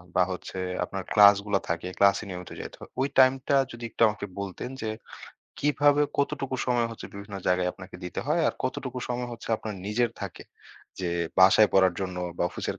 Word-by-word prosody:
বা 90 - +5
হচ্ছে 90 +1 -6 0.3
আপনার 95 -1 -5
class 100 -1 +8
গুলা 100 -2 +1
থাকে 85 +2 -2
class 100 0 +5
এ - - -8
নিয়মিত 90 -1 -7
যাইতে - - -8
হয়। - - -11
ওই 135 - +2
time 130 0 +7
টা 140 - +4
যদি 120 0 -9
একটু - - -9
আমাকে 105 -1 -3
বলতেন 100 +5 -5
যে, 110 - -1 0.7
কিভাবে 145 0 +3 0.2
কতটুকু 140 -2 -1
সময় 120 -2 +2
হচ্ছে 115 - -8
বিভিন্ন 100 0 -7
জায়গায় 90 0 +2
আপনাকে 95 -1 -11
দিতে 90 - -4
হয় 160 +3 +2
আর - - -3
কতটুকু 130 0 -3
সময় 125 0 -2
হচ্ছে 115 -1 -9
আপনার 110 -2 -6
নিজের 115 +3 +1
থাকে? - - -6 0.6
যে 90 - -1 0.3
বাসায় 100 +3 +7
পড়ার 95 -2 +4
জন্য 90 -1 -3 0.2
বা - - +1
office - - -6
এর - - -6
105 Hz, 195 wpm, -27 LUFS, 95-125 Hz, 0.7 s, class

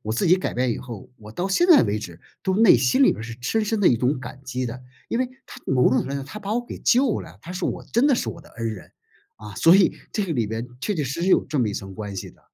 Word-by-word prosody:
我 110 - -6
自 - - 0
己 175 - +6
改 185 - -3
变 125 0 +1
以 - - -5
后， 120 -5 -9
我 105 -1 -12
到 175 - -3
现 195 - +2
在 345 -4 +7
为 105 0 0
止 85 -5 -9 0.2
都 190 -1 0
内 225 -2 +7
心 130 - +3
里 - - +6
边 - - -4
儿 - - -6
是 115 0 -7
深 220 - 0
深 220 +1 0
的 195 - +4
一 120 - +4
种 130 +3 +1
感 130 +1 -9
激 130 0 -3
的， 120 +1 -5 0.3
因 230 - 0
为 255 0 0 0.2
她 - - -12
某 125 -1 +3
种 130 - +3
程 - - +1
度 - - -6
来 140 - -3
讲 140 -1 -4
她 210 - -8
把 210 0 -3
我 245 +1 -1
给 - - -8
救 255 -2 +2
了， - - -12
她 175 - -8
是 185 0 -2
我 - - -4
真 240 +5 +4
的 285 - +4
是 - - -2
我 170 - -10
的 - - -18
恩 115 0 -5
人。 100 - -11 0.5
啊， 105 -1 -10
所 165 - +6
以 195 - +3 0.2
这 210 - 0
个 175 - -3
里 120 -6 0
边 110 +3 -4
确 210 - -1
确 150 -5 -1
实 140 +6 -4
实 180 - 0
有 - - +4
这 150 - -3
么 120 -4 +2
一 100 - -4
层 95 -1 -6
关 100 -1 -6
系 - - -6
的。 - - -25
135 Hz, 345 characters per minute, -23 LUFS, -, 0.5 s, 在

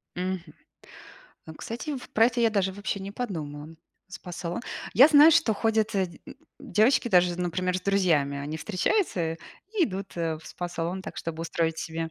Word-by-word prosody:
Мгм, 185 0 -2 1.1
ну, 160 - -9
кстати, 250 - -5
в 250 - -10
про 225 +1 +5
это 245 0 -1
я 230 -1 +4
даже 195 -3 0
вообще 205 0 -4
не 195 +1 -6
подумала. 160 -9 -5 0.3
Спа-салон. 180 -2 -6 0.3
Я 270 +5 +8
знаю, 305 +1 +8
что 220 -7 +3
ходят 220 0 +1
д 190 -2 +1 0.5
девочки 240 +1 +2
даже, 180 -3 +3
например, 180 +1 -1
с - - -15
друзьями. 170 -8 +2
Они 145 +3 -4
встречаются 185 - 0 0.4
и 375 - +4
идут 195 -3 -6
в 160 -2 -2
спа-салон 175 +1 -4
так, - - -8
чтобы 165 -1 -5
устроить 165 -1 -1
себе 165 -1 -4
185 Hz, 160 wpm, -27 LUFS, 165-220 Hz, 1.1 s, Я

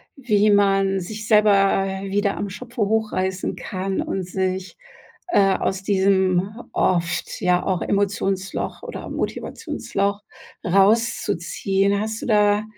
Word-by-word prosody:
Wie 215 -6 +2
man 195 -1 +3
sich 210 +4 -6
selber, 210 -1 +5 0.4
äh, 190 0 -5
wieder 205 0 0
am 200 - -3
Schopfe 240 +3 -7
hochreißen 200 -3 0
kann 190 0 -4
und 190 - -3
sich, 185 0 -3 0.5
äh, 195 - +4
aus 190 -1 -2
diesem 190 -2 +2 0.3
oft, 175 -1 0
ja, 180 0 +2
auch 185 -2 0
Emotionsloch 195 -1 -1
oder - - -7
Motivationsloch 200 +1 -3 0.4
rauszuziehen? 195 -1 +1
Hast 220 +1 -3
du - - -5
da 210 -1 +3
195 Hz, 115 wpm, -22 LUFS, 190-210 Hz, 0.5 s, selber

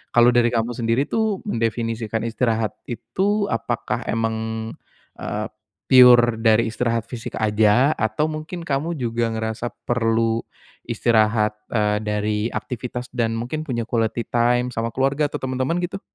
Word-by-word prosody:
Kalau 120 0 +7
dari 120 -1 +4
kamu 115 0 0
sendiri 115 +2 0
tuh 215 +4 -1
mendefinisikan 115 - -2
istirahat 115 -1 0 0.2
itu 200 - -1
apakah 120 +1 -2
memang, 110 0 -2 0.5
eee, 105 +1 -3 0.4
pure 125 -2 +7
dari 110 0 +4
istirahat 115 0 -1
fisik 115 -1 -7
aja 110 +6 +3
atau 110 +8 0
mungkin 155 +2 -5
kamu 155 +3 -1
juga 115 -2 -1
ngerasa 110 +1 -3 0.2
perlu 115 -1 +1 0.4
istirahat, 110 -2 +2 0.2
eee, 105 -2 +1
dari 105 0 -1
aktivitas 125 0 -5
dan 115 -2 0
mungkin 125 +7 -3
punya 125 -7 -3
quality 115 0 -1
time 120 +1 +1
sama 115 +1 -2
keluarga 135 +4 0
atau - - -4
temen-temen 130 +5 -1
gitu? 195 +2 -7
115 Hz, 135 wpm, -22 LUFS, 110-130 Hz, 0.5 s, Kalau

